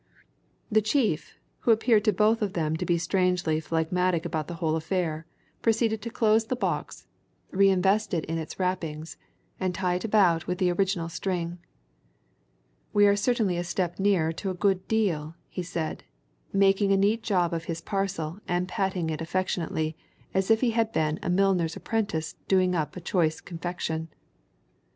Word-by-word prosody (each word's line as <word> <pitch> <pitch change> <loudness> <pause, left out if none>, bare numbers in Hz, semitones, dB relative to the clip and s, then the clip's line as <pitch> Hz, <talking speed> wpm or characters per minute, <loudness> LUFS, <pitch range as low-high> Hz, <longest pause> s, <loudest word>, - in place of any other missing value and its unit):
The 215 0 +5
chief, 220 - 0 0.2
who - - -2
appeared 225 -1 +4
to 215 - +5
both 215 +3 +2
of 200 -3 -1
them 160 -2 0
to - - -3
be 175 - +3
strangely 175 -2 +1
phlegmatic 165 +2 0
about 155 -3 -2
the 175 - -5
whole 160 -1 0
affair, 160 -1 -2 0.3
proceeded 225 -1 +1
to 235 - -5
close 220 -1 +3
the 255 - -1
box, 250 - -3 0.5
re 195 +1 +5
invest 195 +3 +2
it 160 - -1
in 165 +1 -2
its 160 +3 -7
wrappings, 165 -4 -3 0.4
and 185 -2 -1
tie 180 -1 0
it 180 - -2
about 195 -7 +3
with 180 - -1
the 180 -1 +2
original 185 -2 0
string. 175 0 -3 1.3
"We 205 0 +6
are 200 0 +5
certainly 205 -4 +1
a 175 - -1
step 175 0 -2
nearer 190 -5 +2
to 190 +4 -4
a 185 - -3
good 190 0 +1
deal," 170 -8 0
he 180 - -5
said, 170 -2 -4 0.5
making 195 0 +3
a 195 - +5
neat 210 +4 +2
job 180 -5 +1
of 165 0 -3
his 165 -1 -3
parcel 190 -2 -3
and 175 +1 0
patting 185 -3 -1
it 155 - -4
affectionately 165 -2 -1 0.4
as 190 +1 +1
if 225 0 +4
he 245 -3 +3
had 225 -1 +1
been 155 -5 0
a - - -3
milliner's 180 -3 +2
apprentice 200 -8 -2
doing 185 -1 +3
up 155 -4 -1
a - - -6
choice 160 -3 +1
confection. 165 -2 -4
180 Hz, 170 wpm, -27 LUFS, 165-200 Hz, 1.3 s, We